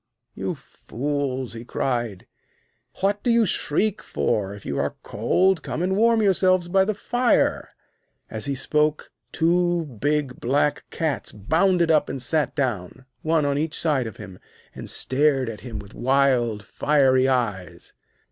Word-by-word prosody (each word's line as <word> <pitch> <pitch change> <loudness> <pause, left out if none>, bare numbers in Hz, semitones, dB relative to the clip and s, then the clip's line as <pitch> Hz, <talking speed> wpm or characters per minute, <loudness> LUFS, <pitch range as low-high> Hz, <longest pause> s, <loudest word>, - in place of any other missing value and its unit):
'You - - -3
fools!' 135 -2 -4
he 115 0 -7
cried. 120 -5 -2 0.8
'What 200 +1 +1
do - - -1
you 230 -1 +4
shriek 200 +4 0
for? 100 -3 -1
If 100 - -13
you 70 - -2
are 70 +1 -1
cold, 180 - +1
come 165 - -3
and 190 +1 +1
warm 225 +1 +3
yourselves 185 -2 +3
by 190 +2 +3
the 215 +1 -1
fire.' 245 +4 +1 0.6
As 110 +2 -6
he 140 -1 -2
spoke, 150 +3 0 0.2
two 175 0 +1
big 140 +1 -2
black 145 +4 0
cats 160 -3 -2
bounded 165 - +2
up 150 -2 +3
and 135 - -4
sat 150 +4 -1
down, 125 - -3 0.2
one 160 -1 +1
on 140 0 0
each 155 0 -2
side 145 -7 +1
of 110 - -9
him, 95 -4 -10 0.3
and - - -8
stared 135 -1 +1
at 110 - -8
him 120 -4 -7
with 100 0 -10
wild, 125 -5 +1
fiery 130 +1 +2
eyes. 110 -9 -2
140 Hz, 150 wpm, -23 LUFS, 120-170 Hz, 0.8 s, you